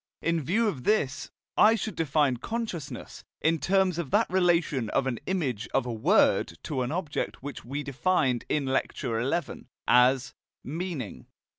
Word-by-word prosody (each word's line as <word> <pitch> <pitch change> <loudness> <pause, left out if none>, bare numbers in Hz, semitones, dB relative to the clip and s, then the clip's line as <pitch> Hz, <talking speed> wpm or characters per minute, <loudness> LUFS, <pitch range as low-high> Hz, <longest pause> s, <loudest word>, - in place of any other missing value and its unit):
In 170 -1 0
view 210 - +1
of 140 -12 -3
this, 145 -9 0 0.3
I 220 +2 +6
should 215 -3 -4
define 145 -4 +2
"consciousness" 185 - -5 0.2
in 160 +1 +2
terms 190 -1 +2
of 165 -6 -3
that - - +3
relation 170 - +2
of 135 - +1
an 125 -3 -2
image 140 - -1
of 135 - +2
a 120 - -3
word 165 - +3
to 140 -5 -2
an 125 +1 -2
object 155 -6 -3
which 140 -2 -6
we 140 +5 -4
defined, 140 -3 +1
in 145 -2 +1
Lecture 130 -3 -1
XI, 150 +2 -2 0.2
as 125 0 +4 0.3
"meaning." 155 - -5
145 Hz, 155 wpm, -28 LUFS, 130-180 Hz, 0.3 s, I